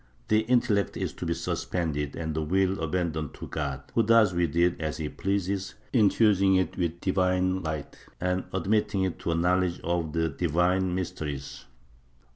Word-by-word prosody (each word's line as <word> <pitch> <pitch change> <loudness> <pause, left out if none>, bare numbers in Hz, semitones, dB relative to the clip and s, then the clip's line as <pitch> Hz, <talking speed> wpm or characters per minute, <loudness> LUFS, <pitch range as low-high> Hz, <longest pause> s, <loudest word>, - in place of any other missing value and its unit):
The 110 - +5
intellect 110 -4 +1
is - - -2
to - - -5
be - - 0
suspended 75 -5 -2
and 80 -1 -3
the 80 - -1
will 95 +4 +1
abandoned 80 -2 -2
to - - -7
God, 70 -3 -4
who 115 - +4
does 110 -3 +5
with 85 -4 0
it 85 0 +2
as 80 -1 -2
he 75 -2 -3
pleases, 100 +1 -2 0.2
infusing 100 -4 +4
it 95 -3 +1
with 85 -1 -2
divine 95 0 +1
light 80 -4 -4 0.2
and 90 +1 -1
admitting 95 +1 +1
it 95 -2 -2
to - - -2
a - - 0
knowledge 90 +1 +1
of 85 -2 -1
the 80 0 +1
divine 90 +4 +1
mysteries. 75 -6 -5
90 Hz, 165 wpm, -27 LUFS, 80-95 Hz, 0.2 s, The